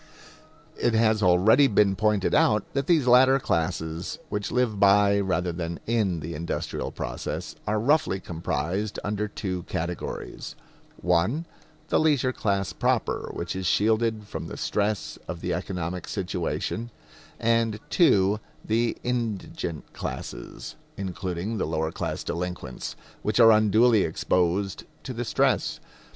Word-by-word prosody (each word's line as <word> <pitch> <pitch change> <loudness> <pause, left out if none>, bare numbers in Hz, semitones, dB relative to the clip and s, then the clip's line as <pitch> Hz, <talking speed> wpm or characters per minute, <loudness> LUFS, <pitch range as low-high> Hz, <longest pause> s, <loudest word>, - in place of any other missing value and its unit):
It 120 - +2
has 110 -1 +3
already 105 +9 +5
been 100 -4 +3
pointed 105 -1 +1
out 105 -1 +4
that 140 0 -1
these 160 -6 +4
latter 130 +2 +6
classes, 85 - -2
which 105 -1 -3
live 120 -5 +1
by, 100 0 +5
rather 90 -2 0
than 85 0 -4
in, 105 -8 0
the 80 +3 -5
industrial 85 +2 -3
process, - - -5
are 105 +1 +1
roughly 135 -5 +2
comprised 90 +4 -3
under 105 +1 -1
two 95 -3 -4
categories 85 +1 -4 0.5
(1) 90 - +2 0.4
the - - +3
leisure 145 -5 +2
class 100 -5 -1
proper, - - 0
which 85 - -4
is 95 -1 -2
shielded 110 +2 +2
from - - -6
the - - -7
stress 105 0 -1
of 85 - -5
the - - -2
economic 90 -1 -4
situation; 95 +4 -3 0.5
and 115 -2 +1
(2) 105 - +4 0.3
the 115 +2 +1
indigent 110 -9 -3
classes, - - -6 0.2
including 95 +2 -3
the - - 0
lower 80 0 -1
class - - -3
delinquents, 85 -7 -4 0.3
which 105 +2 0
are 115 -1 +9
unduly 110 +1 +5
exposed 90 +3 0 0.2
to - - -5
the - - -3
stress. - - +1
100 Hz, 130 wpm, -26 LUFS, 90-115 Hz, 0.5 s, are